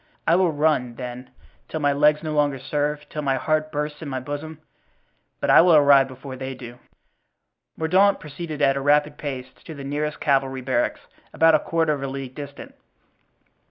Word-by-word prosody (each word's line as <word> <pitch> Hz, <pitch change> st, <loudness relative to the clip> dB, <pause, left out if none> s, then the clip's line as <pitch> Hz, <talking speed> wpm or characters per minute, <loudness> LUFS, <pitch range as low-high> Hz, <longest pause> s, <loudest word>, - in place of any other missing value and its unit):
I 165 Hz, -, +4 dB
will 180 Hz, -2 st, +3 dB
run, 145 Hz, -5 st, 0 dB
then, 125 Hz, +1 st, -7 dB, 0.4 s
till 160 Hz, -, -3 dB
my 145 Hz, -1 st, +2 dB
legs 150 Hz, +2 st, +3 dB
no 155 Hz, -1 st, -3 dB
longer 145 Hz, -2 st, +1 dB
serve, 150 Hz, +2 st, -2 dB
till 150 Hz, -, -5 dB
my 135 Hz, -2 st, 0 dB
heart 155 Hz, +3 st, -1 dB
bursts 150 Hz, +1 st, -4 dB
in 155 Hz, -, -6 dB
my 130 Hz, -1 st, -3 dB
bosom 145 Hz, +4 st, -6 dB, 0.8 s
but -, -, +1 dB
I -, -, +8 dB
will 170 Hz, -1 st, +5 dB
arrive 140 Hz, -2 st, +6 dB
before 130 Hz, 0 st, -9 dB
they 130 Hz, 0 st, -6 dB
do." 120 Hz, -1 st, -11 dB, 1.0 s
Mordaunt 190 Hz, +5 st, +3 dB
proceeded 150 Hz, 0 st, -6 dB
at 135 Hz, -1 st, +4 dB
a 140 Hz, -, -2 dB
rapid 145 Hz, +1 st, +2 dB
pace 130 Hz, -3 st, -6 dB
to 160 Hz, -, -9 dB
the 140 Hz, -, -8 dB
nearest 150 Hz, +2 st, -3 dB
cavalry 135 Hz, -2 st, 0 dB
barracks, 125 Hz, -1 st, -1 dB, 0.3 s
about 165 Hz, 0 st, +4 dB
a 155 Hz, -, +5 dB
quarter 165 Hz, -1 st, 0 dB
of 140 Hz, -, -5 dB
a 135 Hz, -, -3 dB
league 135 Hz, -1 st, -6 dB
distant. 140 Hz, 0 st, -9 dB
145 Hz, 185 wpm, -23 LUFS, 135-155 Hz, 1.0 s, I